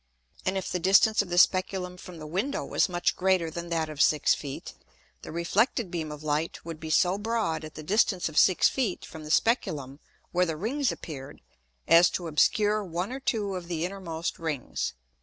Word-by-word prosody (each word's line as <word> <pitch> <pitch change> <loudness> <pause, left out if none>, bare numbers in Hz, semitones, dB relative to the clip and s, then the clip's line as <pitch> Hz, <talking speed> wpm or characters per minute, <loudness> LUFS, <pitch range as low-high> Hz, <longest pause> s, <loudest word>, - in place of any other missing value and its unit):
And 190 +1 +1
if 190 - -3
the 180 - -1
distance 195 +5 +5
of 200 - -7
the 175 - -2
Speculum 185 0 +2
from 180 -1 -11
the 155 - -8
Window 195 - -2
was - - +1
much 175 -1 0
greater 185 -3 +1
than 170 +1 -6
that 165 -2 0
of 150 -2 -3
six 150 -1 +4
Feet, 140 -2 -6 0.5
the - - -9
reflected 190 - 0
beam 160 -4 -3
of 150 0 -8
Light 155 +2 -2
would 165 -2 -7
be 160 - -7
so 180 +4 +3
broad 215 -8 -1
at 155 0 -9
the 155 - -7
distance 195 +1 +2
of 155 - -8
six 185 +3 +5
Feet 240 -9 -2
from 160 -2 -10
the - - -8
Speculum 150 - 0 0.3
where 180 0 +2
the 160 -1 -3
Rings 255 - 0
appear'd, 145 -3 -8 0.5
as 170 +1 +7
to 175 - -4
obscure 210 +7 +2
one 180 +3 -3
or 265 - -4
two 210 -7 -1
of 180 -2 -5
the 170 -1 -2
innermost 180 -3 -4
Rings. 150 - -3
175 Hz, 195 wpm, -27 LUFS, 160-195 Hz, 0.5 s, as